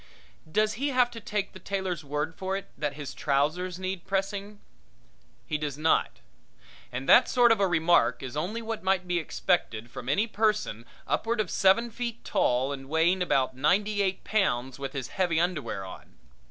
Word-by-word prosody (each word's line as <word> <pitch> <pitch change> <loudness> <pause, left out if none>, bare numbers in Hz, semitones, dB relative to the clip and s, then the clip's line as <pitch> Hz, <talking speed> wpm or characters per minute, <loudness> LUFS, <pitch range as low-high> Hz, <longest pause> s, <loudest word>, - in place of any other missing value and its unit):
Does 215 +4 +2
he 285 - +2
have 250 -3 +3
to 230 - -7
take 205 -2 -3
the 190 - -10
tailor's 185 -3 -3
word 150 +3 -2
for 190 +3 -3
it 195 - -9
that 145 -2 -3
his 145 -2 -6
trousers 155 +6 0
need 185 -1 -4
pressing? 200 +1 -2 0.9
He 150 -2 -2
does 145 -2 -3
not. 160 +1 +1 0.7
And 130 +2 -5
that 245 - +7
sort 245 -2 +5
of 225 - +3
a 195 - +3
remark 170 -3 +3
is 130 +1 -6
only 195 +10 -3
what 225 -1 -4
might 190 -1 +1
be 175 -1 +1
expected 120 - -1
from 125 - -7
any 200 +10 +3
person 210 - -1 0.2
upward 230 0 -1
of 210 -5 -1
seven 210 +5 +3
feet 235 0 -5
tall 125 +3 +1
and 135 -1 -8
weighing 165 +4 +2
about 135 -7 +1
ninety 200 +9 +2
eight 190 -1 -1
pounds 135 - 0
with 135 -1 -5
his 135 -3 -4
heavy 175 -4 +1
underwear 165 - -2
on. 95 - -12
180 Hz, 180 wpm, -28 LUFS, 145-205 Hz, 0.9 s, that